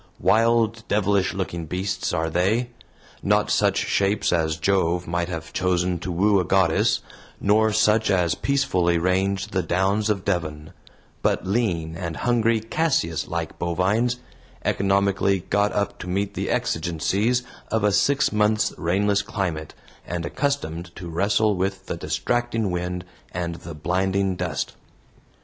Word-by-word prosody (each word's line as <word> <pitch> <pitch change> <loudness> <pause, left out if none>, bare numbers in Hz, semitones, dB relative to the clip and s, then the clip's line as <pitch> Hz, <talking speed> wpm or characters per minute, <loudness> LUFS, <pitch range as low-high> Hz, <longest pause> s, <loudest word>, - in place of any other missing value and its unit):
Wild, 115 0 +3
devilish 100 -2 +1
looking 85 -4 -3
beasts 95 +2 -2
are 80 +1 0
they; 110 +9 +1 0.5
not - - +2
such - - +3
shapes 100 -1 +1
as 80 -2 +1
Jove 90 -2 +1
might 85 +1 -2
have 80 -2 -6
chosen 90 -1 0
to 90 - -4
woo 100 +3 +3
a - - +1
goddess, 90 -2 +2 0.4
nor 110 +2 +3
such 110 0 +3
as 90 -4 +2
peacefully 95 -12 +1
range 95 +3 0
the 95 - 0
downs 100 +5 +1
of 100 -3 -1
Devon, 80 -5 -2 0.5
but - - +1
lean 90 -6 0
and 85 -2 -4
hungry 115 -2 +2
Cassius 115 - 0
like - - -4
bovines, 95 +8 +1 0.5
economically 100 -1 +2
got 100 +1 +3
up 100 0 -2
to - - -7
meet 100 +2 -1
the - - -3
exigencies 95 +9 0 0.3
of 110 -1 0
a 105 - +4
six 140 +8 +2
months' 105 0 +2
rainless 100 +4 +2
climate, 95 -8 -4 0.3
and 85 -1 -3
accustomed 90 - -2
to 90 -2 -7
wrestle 100 +4 +2
with 95 +1 -2
the - - -3
distracting 110 +7 -1
wind 90 +1 -3 0.3
and 85 -1 -2
the 85 -1 -9
blinding 95 +4 0
dust. - - -3
95 Hz, 140 wpm, -24 LUFS, 85-105 Hz, 0.5 s, a